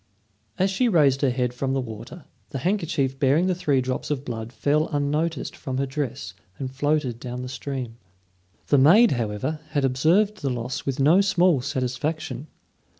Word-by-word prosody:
As 190 +1 +2
she 240 +5 +2
raised 145 - +3
her 140 - +3
head 125 -1 -1
from 135 +1 -2
the 135 - +1
water, 120 +7 -8 0.2
the 140 - -4
handkerchief 150 -5 -1
bearing 145 +6 +3
the 185 - +2
three 145 -7 +1
drops 130 0 -3
of 145 -2 -2
blood 115 -1 -5
fell 150 +4 +1
unnoticed 150 +1 -1
from 130 -1 -5
her 135 - +1
dress 130 -9 -4 0.2
and 130 -1 -5
floated 145 -3 0
down 125 0 -5
the - - -5
stream. 130 -3 -5 0.7
The 145 - +5
maid, 200 - +7
however, 115 +6 -2
had 145 -3 +2
observed 165 +11 +2
the 140 - -2
loss 125 +1 -4
with 135 -1 -1
no 155 +8 +5
small 180 -7 +3
satisfaction. 135 +1 -3
135 Hz, 170 wpm, -24 LUFS, 125-155 Hz, 0.7 s, maid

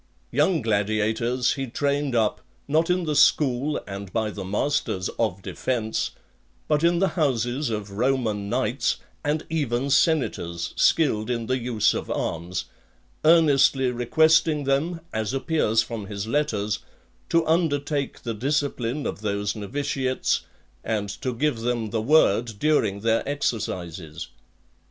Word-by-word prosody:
Young 150 +2 +2
gladiators 110 +3 +1
he 135 -1 -4
trained 140 +1 -1
up, 110 -2 +1 0.3
not 160 +4 +2
in 180 0 +2
the 155 -2 -1
school, 140 0 +3
and 100 -1 -7
by 110 -2 -1
the 100 -1 -6
masters, 100 -1 -1
of 95 -4 -1
defence, 110 -1 -2 0.6
but 150 0 +1
in 170 +1 +4
the 190 +2 +2
houses 130 -3 0
of 105 -2 -4
Roman 110 -3 0
knights, 125 +1 0 0.3
and 150 +2 -1
even 140 -4 -1
senators, 105 - +1
skilled 125 -9 +2
in 115 -2 -1
the 130 +2 0
use 115 -3 +2
of - - -4
arms, 85 +2 -3 0.6
earnestly 140 -5 +5
requesting 155 +5 +3
them, 150 +5 0
as 110 +3 -1
appears 135 -6 +1
from 110 -4 -6
his 100 0 -4
letters, 110 -6 0 0.5
to 165 -1 +3
undertake 145 -4 0
the 115 - -2
discipline 140 +1 -1
of - - -4
those 100 0 -1
novitiates, 130 +4 -1 0.4
and 105 -2 -2
to 125 +7 -3
give 125 0 0
them 115 -2 -2
the 110 -1 0
word 120 -4 +3
during 110 -9 +1
their 115 +1 +2
exercises. 90 - -3
125 Hz, 130 wpm, -25 LUFS, 110-145 Hz, 0.6 s, earnestly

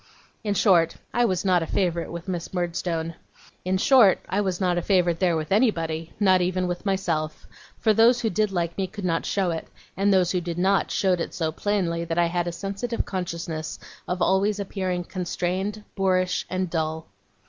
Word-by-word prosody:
In 205 -2 -1
short, 170 -6 +4 0.2
I 240 0 +3
was 185 -4 0
not 180 -2 +4
a 165 - -3
favourite 175 -3 -1
with 170 +1 -7
Miss 180 0 -4
Murdstone. 170 -2 -2 0.5
In 185 +1 +1
short, 220 -2 +6
I 200 - 0
was 190 -3 -1
not 180 -2 +1
a - - -2
favourite 175 -3 +2
there 175 -3 +2
with 155 +2 -4
anybody, 165 -7 +1
not 190 -3 +4
even 180 +1 0
with 175 +3 -4
myself; 165 -5 -1 0.3
for 220 - +3
those 235 +3 +5
who 225 - 0
did 215 +2 +1
like 170 -2 -1
me 190 - 0
could 205 0 -7
not 165 -2 0
show 190 -3 +1
it, 165 - -4 0.3
and 200 +2 +2
those 185 -2 +3
who 180 - 0
did 170 -1 -4
not, 190 +2 +2
showed 185 -3 +1
it - - -4
so 160 -3 -1
plainly 170 -2 -1
that 165 0 -3
I 175 - +4
had 175 0 -1
a - - -1
sensitive 200 +6 -3
consciousness 170 -4 -4 0.3
of 180 0 -1
always 200 +2 +2
appearing 185 -2 -2
constrained, 185 +3 -3
boorish, 185 -2 +1
and 185 0 -1
dull. 160 -1 -2
180 Hz, 190 wpm, -25 LUFS, 170-195 Hz, 0.5 s, short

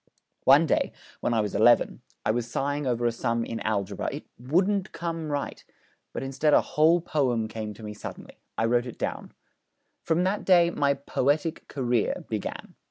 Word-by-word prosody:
One - - +7
day, - - +1 0.3
when 120 - 0
I 110 - +3
was 105 -2 -3
eleven, - - +4 0.2
I 110 - +3
was 120 +1 -2
sighing 145 +3 -1
over 120 -1 0
a 120 - +3
sum 115 0 -1
in 115 - -4
algebra; 100 -2 -2
it - - -7
wouldn't 185 +10 +1
come 165 -2 -4
right; 145 -1 -3 0.5
but - - -4
instead 135 +3 +2
a - - +6
whole 160 +3 +5
poem 125 -9 0
came 110 -1 -6
to 110 - -12
me 105 0 -5
suddenly. 105 - -9 0.2
I 115 - +2
wrote 120 +1 +2
it 120 - -8
down. - - -4 0.7
'From 165 +2 +1
that 195 +3 0
day 175 -2 +5
my 140 -3 +2
"poetic 145 +4 -1
career" 125 -5 -1
began. - - -4
135 Hz, 175 wpm, -27 LUFS, 115-160 Hz, 0.7 s, One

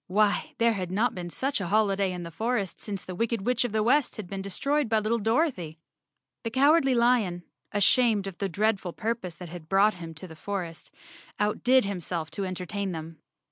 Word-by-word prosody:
Why, 205 +2 +1
there 230 0 +3
had 185 -4 -3
not 215 +6 +1
been 175 -1 -5
such 270 +5 -1
a 185 - -2
holiday 200 -1 +2
in 180 -1 -5
the 170 - -7
forest 220 0 -2
since 200 -3 -4
the 185 - -6
wicked 230 +1 -1
Witch 250 -1 +2
of 245 - -2
the 215 0 +1
West 275 +5 +3
had 215 -5 -6
been 195 +1 -5
destroyed 275 +8 0
by 220 -1 +3
lit¬ - - -5
tle 235 0 +2
Dorothy. 225 - 0 0.6
The 230 - -3
Cowardly 270 +2 +4
Lion, 235 -8 +2 0.3
ashamed 210 0 +3
of 195 -3 -7
the 195 - -1
dreadful 200 -1 0
pur¬ 230 +2 -2
pose 180 -3 -6
that 175 -1 -9
had 170 -1 -10
brought 200 +2 +5
him 165 -2 -9
to 185 +4 -8
the 160 - -11
forest, 175 -1 -5 0.5
outdid 245 +5 +3
him¬ 200 -3 -3
self 160 -2 -3
to 195 +4 -3
entertain 185 +1 -3
them. 160 0 -7
200 Hz, 210 wpm, -27 LUFS, 180-230 Hz, 0.6 s, brought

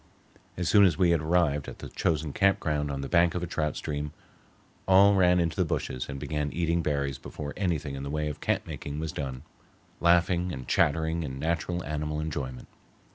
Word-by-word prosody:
As 90 -1 -1
soon 100 +1 +6
as 90 -6 +4
we 90 -2 +4
had 85 -3 +2
arrived 75 -3 +1
at - - -8
the - - -8
chosen 75 -3 -1
campground 75 -7 +1
on 70 -1 -3
the 70 - -4
bank 85 +3 +3
of 90 - -2
a - - 0
trout 75 -3 -2
stream, 75 0 -4 0.7
all 100 +2 +7
ran 90 -2 +4
into 85 -2 0
the - - +2
bushes 65 +1 -3
and 70 0 -5
began 75 +1 -2
eating 85 0 0
berries 70 -3 -1
before 75 +2 -7
anything 80 -7 -1
in 70 - -5
the 70 - -5
way 75 +1 -1
of 75 - -6
camp - - 0
making 70 0 -6
was 80 -1 -3
done, 65 -3 -5 0.6
laughing 85 +1 +3
and 65 -4 -7
chattering 80 +2 +2
in 65 -4 -5
natural 85 +3 -1
animal 75 0 -3
enjoyment. 70 -5 -4
75 Hz, 195 wpm, -28 LUFS, 70-85 Hz, 0.7 s, all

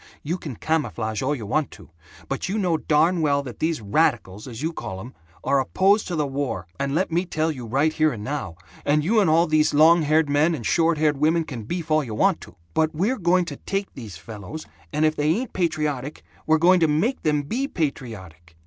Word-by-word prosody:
You 170 +5 -2
can 145 -8 -7
camouflage 115 -8 -2
all 140 +3 0
you 115 -6 -7
want 150 +8 0
to, - - -15 0.4
but - - -3
you 205 - -1
know 180 -5 +1
darn 160 +3 +2
well 140 -2 +2
that 125 -4 -9
these 160 -4 -1
radicals, 100 0 0
as 120 +2 -7
you 165 +1 -1
call 110 -10 -6
'em, 120 +6 -9 0.3
are 140 - +2
opposed 195 +10 +2
to 175 - -3
the 150 -2 0
war, 135 -10 -3
and 140 +1 -1
let 180 +1 0
me 170 +2 +1
tell 160 -3 -1
you 125 -6 -7
right 140 +7 +1
here 155 -1 +2
and 105 -5 -6
now, 135 - -4 0.3
and 150 +1 +2
you 215 +7 +3
and 195 -6 +3
all 165 +2 +4
these 155 -2 +2
long 165 +3 +6
haired 155 +1 +2
men 150 +4 +2
and 120 -7 -7
short 165 +4 +2
haired 150 -2 +2
women 160 +3 +2
can 125 -8 -7
beef 170 +3 -4
all 155 0 +3
you 115 -5 -6
want 195 - +2
to, - - -13 0.2
but 160 0 +1
we're 210 +11 0
going 180 0 +2
to 145 -4 -7
take 195 0 -4
these 110 -9 -9
fellows, 105 - -9 0.3
and 150 +1 +1
if 155 0 +2
they 150 +1 0
ain't 225 +9 -1
patriotic, 150 -5 -2 0.2
we're 160 0 +5
going 180 +3 +5
to 165 - +4
make 180 - 0
them 150 -1 +1
be 250 - -2
patriotic. 95 - -5
155 Hz, 225 wpm, -23 LUFS, 135-165 Hz, 0.4 s, long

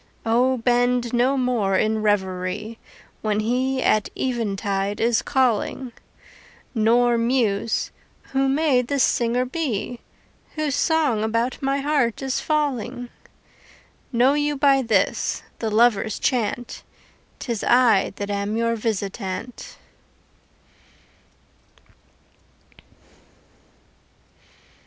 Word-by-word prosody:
O 250 +3 +2
bend 245 0 +1
no 250 +3 +2
more 235 -7 +1
in 220 0 +1
revery 200 +1 -1 0.4
When 210 -1 0
he 255 +4 0
at 215 -1 +2
eventide 205 -5 -2
is 230 0 +2
calling. 255 -1 0 0.8
Nor 235 +1 +3
muse: 230 -3 0 0.4
Who 270 0 +2
may 280 -2 +2
this 270 +2 0
singer 240 +1 +1
be 250 -5 -3 0.6
Whose 305 -2 -1
song 285 -7 +1
about 230 +4 -1
my 275 +1 0
heart 275 -4 0
is 265 0 -1
falling? 275 -5 -2 1.0
Know 250 +2 +4
you 295 0 0
by 275 -1 +4
this, 225 -6 0 0.2
the 225 - -2
lover's 220 -2 +2
chant, 245 -1 -2 0.6
'Tis 235 -5 -4
I 240 -5 +4
that 205 0 -4
am 200 +2 -2
your 230 0 +1
visitant. 210 +1 -4
240 Hz, 95 wpm, -23 LUFS, 215-260 Hz, 1.0 s, Know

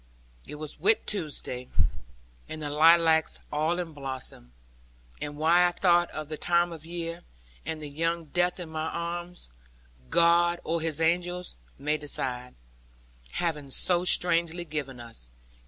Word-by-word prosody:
It - - -7
was 150 0 -7
Whit 430 +1 +4
Tuesday, 145 -9 -2 0.8
and 155 - -6
the 145 - -3
lilacs 160 +1 +5
all 155 +4 +1
in 175 -3 -4
blossom; 130 - -6 0.7
and 145 0 -5
why 170 +3 +5
I - - 0
thought 175 -1 +3
of 155 -1 -6
the 155 0 -5
time 175 +1 +2
of 160 -1 -8
year, 170 0 -4 0.5
with 160 - -3
the 150 - -5
young 165 +3 -1
death 175 +4 0
in 175 -3 -6
my 160 0 -3
arms, 175 - -5 0.6
God 170 - +4
or 165 +1 -1
His 160 -2 0
angels, 175 +2 0 0.2
may 150 +2 0
decide, 125 -4 -4 0.8
having 150 -5 -2
so 175 +6 +3
strangely 175 -1 +2
given 145 -5 -5
us. 115 - -9
165 Hz, 140 wpm, -28 LUFS, 150-175 Hz, 0.8 s, lilacs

